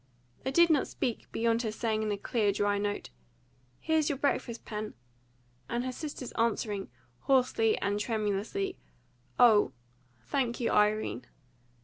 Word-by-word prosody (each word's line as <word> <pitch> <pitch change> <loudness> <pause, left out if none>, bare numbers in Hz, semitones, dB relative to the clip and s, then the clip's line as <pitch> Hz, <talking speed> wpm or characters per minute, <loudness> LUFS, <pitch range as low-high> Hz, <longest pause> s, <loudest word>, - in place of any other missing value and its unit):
They - - -2
did 340 +4 +5
not 295 -4 +3
speak, 235 - -3
beyond 230 0 +1
her 220 -3 -2
saying, 220 0 -1
in 215 -1 -1
a 205 - -1
clear 210 0 +1
dry 205 0 +1
note, 205 - -3 0.7
"Here's 315 -2 +1
your 285 - -1
breakfast, 250 -4 -1
Pen," 215 0 -5 0.7
and 240 +1 -1
her 255 - -2
sister's 280 -2 -6
answering, 215 -3 -1 0.3
hoarsely 250 -4 +3
and 200 +1 0
tremulously, 220 - -2 0.6
"Oh, 225 -4 +6 0.5
thank 240 - -1
you, 240 - 0
Irene." 210 - +1
225 Hz, 135 wpm, -30 LUFS, 210-255 Hz, 0.7 s, Oh